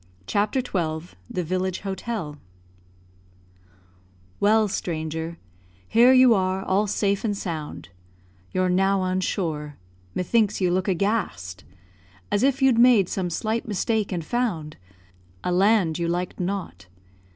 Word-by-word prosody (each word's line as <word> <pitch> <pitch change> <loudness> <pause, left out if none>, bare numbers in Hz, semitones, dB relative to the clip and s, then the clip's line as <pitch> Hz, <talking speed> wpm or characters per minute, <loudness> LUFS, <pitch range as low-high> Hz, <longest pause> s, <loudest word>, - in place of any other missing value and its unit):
CHAPTER 210 - +1
XII 170 -7 -3
THE 180 - -2
VILLAGE 185 +2 -2
HOTEL 195 -5 -4 2.0
Well, 215 +1 +4
stranger, 160 -2 -4 0.5
here 240 +3 +6
you 255 -2 +7
are 190 -1 0
all 200 +2 +1
safe 200 0 0
and 205 -3 -1
sound; 160 - -5 0.6
You're 185 0 +1
now 195 +2 +2
on 185 0 0
shore. 150 -6 -3 0.4
Methinks 205 +3 +1
you 180 -2 +2
look 185 +2 0
aghast, 190 - -1 0.7
As 205 - +2
if 270 0 +2
you'd 255 -4 +4
made 235 -7 +6
some 185 -2 -2
slight 220 +7 -2
mistake, 215 0 -1
and 170 -4 -3
found 180 -11 -2 0.7
A 180 - -1
land 185 -3 +3
you 170 - 0
liked 175 +1 -2
not. 180 - -4
190 Hz, 125 wpm, -24 LUFS, 170-215 Hz, 2.0 s, you